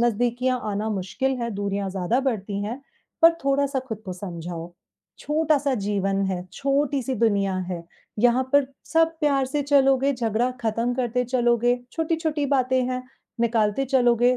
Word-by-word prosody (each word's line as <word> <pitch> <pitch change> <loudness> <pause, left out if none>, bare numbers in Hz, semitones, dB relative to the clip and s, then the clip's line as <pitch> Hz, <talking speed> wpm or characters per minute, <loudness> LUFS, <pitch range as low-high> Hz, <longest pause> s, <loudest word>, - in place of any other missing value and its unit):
नज़दीकियाँ 245 +2 +1
आना 210 +2 -2
मुश्किल 250 +7 -1
हैं, 235 -1 -2
दूरियाँ 200 0 -2
ज़्यादा 195 +7 0
बढ़ती 210 -6 -2
हैं। 235 +6 -5 0.4
पर 330 +1 +9
थोड़ा-सा 275 0 +1
खुद 220 -3 -4
को 185 - -5
समझाओ, 175 -2 -6 0.5
छोटा-सा 295 -3 +1
जीवन 195 -2 0
है, 185 -2 -2
छोटी-सी 275 -1 0
दुनिया 200 -4 +1
है, 175 -2 -4 0.4
यहाँ 245 +3 +4
पर 285 -1 +5 0.3
सब 325 0 +3
प्यार 275 -3 +2
से 290 +2 -1
चलोगे, 275 -1 +3
झगड़ा 235 +1 0
खत्म 230 +2 0
करते 250 -1 0
चलोगे, 240 0 +2
छोटी-छोटी 320 -2 -1
बातें 255 0 +2
हैं, 255 0 -2 0.4
निकालते 230 +2 +2
चलोगे, 245 -1 +3
245 Hz, 140 wpm, -24 LUFS, 210-270 Hz, 0.5 s, पर